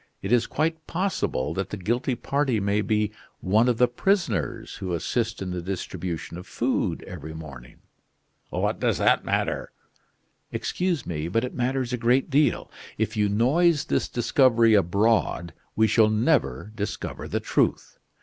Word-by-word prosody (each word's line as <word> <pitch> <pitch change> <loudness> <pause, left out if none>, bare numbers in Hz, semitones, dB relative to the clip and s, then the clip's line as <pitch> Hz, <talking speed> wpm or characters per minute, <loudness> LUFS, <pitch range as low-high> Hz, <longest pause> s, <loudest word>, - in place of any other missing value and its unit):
It 100 - -3
is 120 -2 +3
quite 160 +1 -1
possible 170 - -1
that 95 +3 -3
the 105 - -5
guilty 120 +7 -1
party 135 -1 0
may 100 +1 +1
be 105 0 0 0.3
one 110 +6 +3
of 120 - +1
the 125 - +5
prisoners 190 +10 -1
who 90 -2 -4
assist 110 +4 -2
in 90 - -4
the 90 -1 -3
distribution 85 -2 -5
of 90 - -11
food - - -1
every 80 -4 -8
morning." 70 -6 -11 0.7
"What - - -1
does - - +1
that - - +3
matter?" - - -1 0.8
"Excuse 180 -6 -1
me, 80 -1 -3
but 115 +7 0
it 125 - -4
matters 130 0 -1
a - - 0
great 125 +5 +2
deal. 140 -2 +2 0.3
If 110 +1 -1
you 105 -1 +2
noise 150 - +3
this - - 0
discovery 120 -3 +4
abroad, 100 -3 +2 0.2
we 110 - +4
shall 110 0 +4
never 110 - +1
discover 105 -1 -4
the - - -1
truth. - - 0
110 Hz, 155 wpm, -25 LUFS, 95-130 Hz, 0.8 s, the